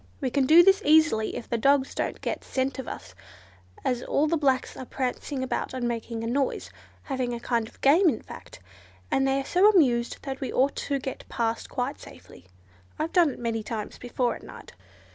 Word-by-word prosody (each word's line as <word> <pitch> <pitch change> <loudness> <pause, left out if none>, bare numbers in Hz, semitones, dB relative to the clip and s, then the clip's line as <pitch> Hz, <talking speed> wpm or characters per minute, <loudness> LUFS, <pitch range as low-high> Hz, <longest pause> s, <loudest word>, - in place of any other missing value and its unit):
We 260 -3 -2
can 270 0 +2
do 330 +4 +8
this 390 +3 +5
easily 310 -8 +3
if - - -6
the 235 - -1
dogs 275 +2 +3
don't - - -3
get - - -3
scent 265 +1 -2
of 265 - -6
us, 95 - -8 0.7
as 250 -2 0
all 285 - +1
the 320 +2 +1
blacks 270 -4 +1
are - - -7
prancing 260 +1 -3
about 260 - -3
and 245 -2 -1
making 230 -1 -4
a - - -3
noise, 270 +3 -1 0.3
having 255 -4 -2
a - - -6
kind 235 -2 -1
of - - -18
game 330 +7 +5
in 230 - -3
fact, - - -11 0.5
and 270 0 +2
they 270 0 +2
are 270 - -4
so 370 +7 +5
amused 250 - +3
that 270 0 -5
we 265 - -3
ought 270 +2 +2
to 280 - -1
get 265 0 -7
past 230 -1 -2
quite 255 +1 -3
safely. 90 - -14 0.5
I've 320 +2 -3
done 345 -4 +5
it - - -7
many 230 -2 -2
times 215 -1 -6
before 245 0 -1
at - - -11
night." - - -12
260 Hz, 205 wpm, -26 LUFS, 240-285 Hz, 0.7 s, do